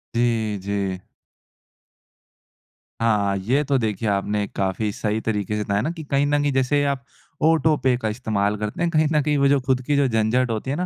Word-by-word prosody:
जी, 115 -3 +1
जी। 100 -2 -2 2.0
हाँ 105 -3 +2
ये 125 +10 +1
तो 140 -2 +1
देखिए 110 -2 -1
आपने 100 +1 0
काफ़ी 100 +2 -1
सही 110 +1 -2
तरीक़े 105 -1 -2
से 105 - -1
बताया 100 0 0
ना 160 - -1
कि 165 -2 -8
कहीं 140 0 +1
न 145 0 +2
कहीं 145 0 +1
जैसे 135 +2 +2
आप 140 -3 -1 0.4
ऑटो 160 -1 +4
पे 130 -1 +3
का 110 -3 -2
इस्तेमाल 105 -3 -1
करते 105 - -4
हैं। 170 - +2
कहीं 155 -1 +3
न 150 - +3
कहीं 150 +1 +1
वो 140 - +3
जो 140 0 +4
ख़ुद 130 0 0
की 145 - +1
जो 140 -1 +3
झंझट 115 +2 +1
होती 110 +4 -3
है - - -1
ना 180 - -1
115 Hz, 205 wpm, -22 LUFS, 105-140 Hz, 2.0 s, ऑटो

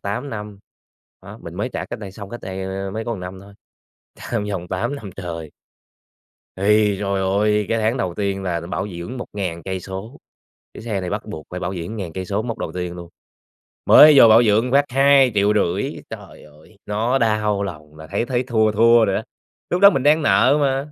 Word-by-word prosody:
8 105 +8 -4
năm. 105 -2 -7 0.6
Đó, - - -11
mình - - -9
mới - - -2
trả - - -4
cách - - -7
đây 100 -3 -8
xong 100 -1 -9
cách 120 - -7
đây, 95 0 -6
ơ, 95 +1 -4
mới 110 +3 -5
có 120 - -4
một 100 - -6
năm 90 +1 -8
thôi, 100 +1 -15 0.6
trả - - -14
trong 110 -4 -1
vòng 90 -3 -4
8 95 +10 -2
năm 105 -7 -8
trời. 85 -5 -7 1.1
Thì 105 0 +3
trời 100 -1 -1
ơi! 105 +2 +1
Cái 115 - 0
tháng 110 +4 +1
đầu 90 -8 -2
tiên 100 0 -2
là 85 -3 -2
bảo 90 +4 -4
dưỡng 90 +7 -7
1.000 95 -8 -5
cây 95 +1 -4
số, 95 +8 -8 0.6
chiếc - - -9
xe 110 -3 -3
này 90 -1 -5
bắt - - -4
buộc 80 - -8
phải 90 - -6
bảo 90 +2 -3
dưỡng 90 +6 -6
ngàn 90 -5 -5
cây 95 0 -5
số 100 +4 -2
mốc 115 -1 -5
đầu 80 - -5
tiên 90 -1 -4
luôn. 85 -1 -9 0.8
Mới 150 0 +9
vô - - +9
bảo 115 +2 +7
dưỡng 115 +3 +2
phát 140 +1 +4
2.500.000, 120 -9 +3 0.2
trời - - -11
ơi! 75 +7 -19
Nó 115 +5 0
đau 105 -4 0
lòng, 75 -5 -8
là 80 0 -11
thấy 100 +5 -2
thấy 125 0 -1
thua 110 -3 +1
thua 115 +1 +5
rồi 95 - 0
á, 110 - -2 0.5
lúc 180 - -1
đó 200 - +10
mình 135 -9 -1
đang 150 +2 +4
nợ 145 0 +4
mà. 135 +1 -1
105 Hz, 215 wpm, -21 LUFS, 95-115 Hz, 1.1 s, đó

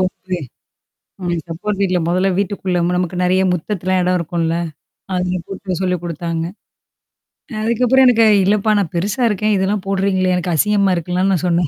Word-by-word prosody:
வம்பு? 185 0 -2 0.8
உனக்கு 175 -3 -2
சப்போர்ட் 195 +5 -3
வீல்ல 185 -2 +2
மொதல்ல 185 +2 +2
வீட்டுக்குள்ள 190 -2 -1
ம்ம 180 +1 0
நமக்கு 180 0 -2
நெறையா 185 +1 +2
முத்தத்தலாம் 185 +1 -1
எடம் 180 0 +2
இருக்கும்ல? 165 0 -1 0.6
அதில 180 0 -1
கூப்ட்டு 190 -2 -5
சொல்லி 180 -1 0
குடுத்தாங்க. 165 0 -3 1.1
அ - - -5
அதுக்கப்புறம் 250 +3 +3
எனக்கு 230 -2 +5 0.2
இல்லப்பா 210 +2 +2
நான் 180 -5 -2
பெருசா 210 +8 -1
இருக்கேன். 210 +1 +1
இதெல்லாம் 195 +1 -1
போடுறீங்களே! 190 -1 +1
எனக்கு 175 -1 -2
அசிங்கம்மா 200 +1 +2
இருக்குன்லாம் 180 +3 0
நான் 180 0 -1
சொன்னேன். 170 -2 +2
185 Hz, 155 wpm, -18 LUFS, 175-200 Hz, 1.1 s, எனக்கு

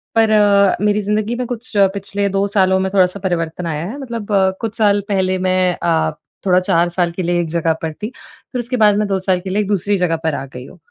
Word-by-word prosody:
पर 225 -1 +4
अ, 200 -2 +4
मेरी 210 0 +2
ज़िन्दगी 210 +3 -1
में 250 - -3
कुछ 240 0 -5
पिछले 200 +1 +1
2 195 +1 0
सालों 190 0 +4
में 190 0 -1
थोड़ा-सा 185 0 +2
परिवर्तन 170 -1 -2
आया 155 +1 -3
है। 265 - -7
मतलब 235 -6 -6
अ, 190 -2 +3
कुछ 225 -1 -4
साल 205 -2 +3
पहले 185 -2 +1
मैं 185 -1 +2
अ, 160 -2 +1 0.3
थोड़ा 180 -1 +4
4 175 -1 +1
साल 175 0 0
के 180 +2 -5
लिए 175 0 0
एक 170 - -3
जगह 165 0 +1
पर 160 - -3
थी। 210 +7 -6
फिर 255 0 -10
उसके 245 +1 -2
बाद 210 -3 +5
मैं 210 0 0
2 195 -1 0
साल 185 -1 0
के 190 +1 -7
लिए 195 +3 0
एक 205 - -3
दूसरी 205 0 0
जगह 175 -2 +1
पर 160 -2 0
आ 135 - -5
गई 125 +1 -8
हूँ। 185 - -14
190 Hz, 250 wpm, -18 LUFS, 175-210 Hz, 0.3 s, बाद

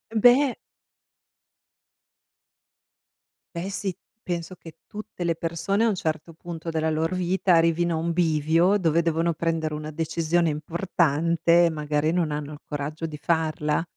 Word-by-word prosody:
Beh 245 +4 +5 3.0
Beh 175 +3 -3
sì, 195 -2 -3 0.3
penso 175 -1 -4
che 165 -3 -13
tutte 210 -4 -7
le 170 -1 +1
persone 170 +6 -1
a - - +4
un 215 - +1
certo 160 -1 -3
punto 165 0 -7
della 160 -1 0
loro 160 +3 0
vita 185 +1 +1
arrivino 165 +1 +2
a - - -1
un 165 +1 -1
bivio 165 +3 +2
dove 170 -3 +2
devono 165 0 +1
prendere 160 -1 -1
una 150 0 -5
decisione 165 +2 0
importante, 170 +1 +2
magari 150 0 0
non 170 -3 0
hanno 150 0 -4
il 145 - -10
coraggio 150 +2 -4
di 155 -2 -6
farla. 155 -1 0
165 Hz, 135 wpm, -25 LUFS, 155-175 Hz, 3.0 s, Beh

